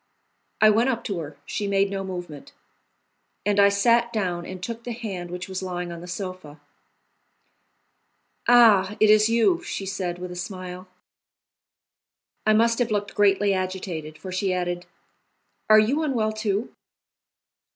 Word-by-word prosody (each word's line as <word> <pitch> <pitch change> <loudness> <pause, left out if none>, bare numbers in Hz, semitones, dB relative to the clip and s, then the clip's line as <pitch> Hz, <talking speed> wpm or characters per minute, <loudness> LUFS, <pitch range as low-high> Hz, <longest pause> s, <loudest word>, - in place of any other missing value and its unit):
I 215 0 +7
went 230 +5 +2
up 235 -3 -2
to 195 -4 -3
her; 155 -2 -8
she 205 - -3
made 195 0 +1
no 195 -1 -3
movement, 175 -6 -8 0.9
and 205 0 +2
I 200 0 +7
sat 235 +4 +3
down 180 -6 -2
and 185 0 -7
took 230 +2 -5
the 240 - -4
hand 195 -7 -6
which 180 +1 -6
was 190 0 -5
lying 180 -2 -4
on 170 0 -8
the 175 - -9
sofa. 180 -5 -7 1.9
"Ah! 215 -5 +6
it 215 -1 +6
is 215 +1 +5
you," 235 +10 +3
she 200 -11 -5
said, 185 -2 -3
with 180 0 -7
a - - -7
smile. 185 0 -7 1.6
I 215 - +6
must 230 +2 +3
have 240 -1 +1
looked 205 -1 -2
greatly 200 0 +3
agitated, 185 -5 -4
for 185 - -8
she 185 +1 -1
added: 175 -1 -2 0.8
"Are 215 - +8
you 240 +9 +3
unwell, 240 -8 0
too?" 215 +1 -2
195 Hz, 150 wpm, -24 LUFS, 180-215 Hz, 1.9 s, Are